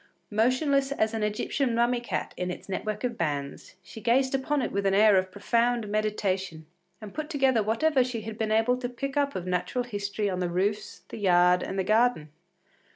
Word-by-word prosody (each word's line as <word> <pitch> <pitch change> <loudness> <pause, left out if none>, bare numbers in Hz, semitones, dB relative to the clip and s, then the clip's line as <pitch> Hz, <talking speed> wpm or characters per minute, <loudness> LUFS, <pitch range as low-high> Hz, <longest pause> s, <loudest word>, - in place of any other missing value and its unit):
Motionless 270 +5 +2
as 220 -5 0
an 225 - -2
Egyptian 230 +4 -1
mummy 240 +1 +2
cat 240 - -4
in 180 0 -3
its 180 - -7
net 195 - -4
work 210 +1 -3
of 240 -2 -3
bands, 145 -4 -3
she 220 - -11
gazed 260 +3 +2
upon 270 +1 0
it - - -2
with 200 0 0
an 195 - +2
air 210 0 +6
of 185 0 +2
profound 230 +3 0
meditation, 195 -6 -2 0.3
and 215 -3 -10
put 310 0 -5
together 270 -7 +2
whatever 255 +6 +2
she 245 -3 -4
had 220 0 -7
been 220 -1 -2
able 225 +3 +3
to 250 -1 -4
pick 275 +3 -5
up 285 -1 0
of 180 - -4
natural 185 +7 -1
history 205 -2 -3
on 185 -2 -2
the 180 -1 -1
roofs, 195 +4 -2
the - - -7
yard, 180 -2 +4
and 195 - -4
the 190 - +1
garden. 215 -6 +2
220 Hz, 205 wpm, -27 LUFS, 195-250 Hz, 0.3 s, air